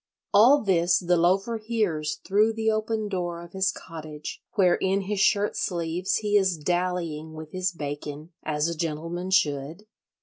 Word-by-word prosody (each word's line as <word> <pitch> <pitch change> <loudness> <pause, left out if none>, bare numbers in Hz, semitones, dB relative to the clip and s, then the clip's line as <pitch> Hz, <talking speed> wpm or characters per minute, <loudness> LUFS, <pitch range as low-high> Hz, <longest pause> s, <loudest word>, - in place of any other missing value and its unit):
All 245 +7 +6
this 175 -3 +3
the 180 -1 +2
Loafer 195 +7 +2
hears 210 -9 -1
through 210 +3 +3
the 220 0 +1
open 215 0 -1
door 175 -3 -3
of 170 - -13
his 190 0 +1
cottage, 155 -4 -8
where 185 -5 +4
in 190 +2 +1
his 200 +1 -3
shirt 205 +1 +3
sleeves 175 0 -1
he 210 -1 0
is 190 -4 +2
dallying 170 -1 -2
with 155 -1 -9
his 185 0 -1
bacon, 145 0 -6
as 150 +1 -1
a 170 - -1
gentleman 165 +3 -3
should. 155 +1 0
180 Hz, 160 wpm, -26 LUFS, 160-200 Hz, -, All